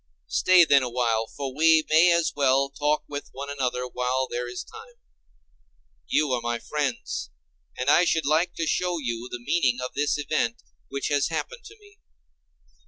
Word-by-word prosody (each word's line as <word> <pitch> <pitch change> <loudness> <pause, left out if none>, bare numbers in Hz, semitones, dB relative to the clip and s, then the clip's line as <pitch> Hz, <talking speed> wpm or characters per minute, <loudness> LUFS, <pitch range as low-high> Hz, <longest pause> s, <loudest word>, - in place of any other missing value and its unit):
Stay 185 -2 +6
then 140 -3 +5
awhile, 120 -3 0
for 135 0 -6
we 160 0 +4
may 165 +3 +6
as 170 -1 +1
well 135 -1 +2
talk 150 +2 0
with 145 0 -6
one 140 +1 -6
another 125 -2 -2
while 125 +1 -1
there 120 0 -4
is 120 - -6
time. 470 +2 -14 1.1
You 150 - +1
are 125 -2 0
my 120 0 -2
friends, 125 - -3 0.5
and 125 - -3
I 175 +5 +5
should 160 -3 +1
like 155 +5 +1
to 165 - -2
show 180 +2 0
you 120 -4 -4
the - - -5
meaning 135 -5 +2
of 125 0 -5
this 145 +1 0
event 140 -5 -2 0.2
which 140 0 -3
has 145 -1 +1
happened 470 - -5
to 435 +1 -13
me. 410 0 -21
140 Hz, 170 wpm, -25 LUFS, 125-160 Hz, 1.1 s, Stay